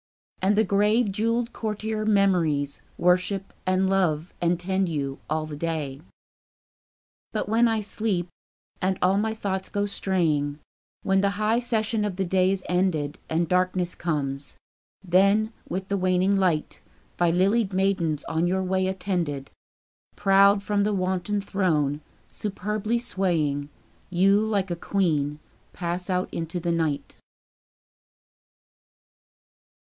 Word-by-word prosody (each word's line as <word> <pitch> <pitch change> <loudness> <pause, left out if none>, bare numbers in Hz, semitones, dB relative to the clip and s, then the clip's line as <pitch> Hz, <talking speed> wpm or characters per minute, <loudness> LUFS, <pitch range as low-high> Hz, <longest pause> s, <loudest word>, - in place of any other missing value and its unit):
And 195 +2 +3
the 220 - +4
grave 210 +3 +2
jewelled 230 +4 0
courtier 215 0 -3
Memories 175 -9 +2 0.2
Worship 185 +3 +1
and 185 +1 +2
love 180 -4 +1
and 170 0 +2
tend 190 +1 0
you, 140 -4 -3
all 155 0 0
the 155 -1 -7
day. 150 -3 -3 1.3
But - - -2
when 230 +3 +4
I 225 -1 +1
sleep, 205 -4 -1 0.5
and 190 0 +1
all 190 +2 +4
my 220 +1 -1
thoughts 190 -3 -3
go 205 0 0
straying, 160 -8 0 0.5
When 195 0 +3
the 200 - +3
high 215 +2 +2
session 225 -2 0
of 205 -3 -2
the 190 0 -1
day 185 +1 +2
is 195 -1 -1
ended, 175 -5 0
And 165 +1 +1
darkness 180 0 +1
comes; 140 -4 -3 0.5
then, 200 +5 +3 0.2
with 190 +1 -3
the 200 - +1
waning 185 +1 +2
light, 180 -6 0 0.4
By 175 -1 +3
lilied 195 +5 +2
maidens 185 -6 0
on 165 +1 0
your 190 +1 0
way 185 0 0
attended, 175 -8 -2 0.6
Proud 200 +1 +5
from 205 0 +1
the 210 0 +1
wonted 190 +2 -1
throne, 155 -8 0 0.3
superbly 210 +2 -2
swaying, 165 - 0 0.4
You, 195 +3 +4
like 205 -4 0
a - - 0
queen, 155 -6 0 0.4
pass 175 +1 -3
out 180 0 -1
into 165 +2 -3
the 170 0 -1
night. 160 -4 -1
185 Hz, 130 wpm, -25 LUFS, 170-200 Hz, 1.3 s, Proud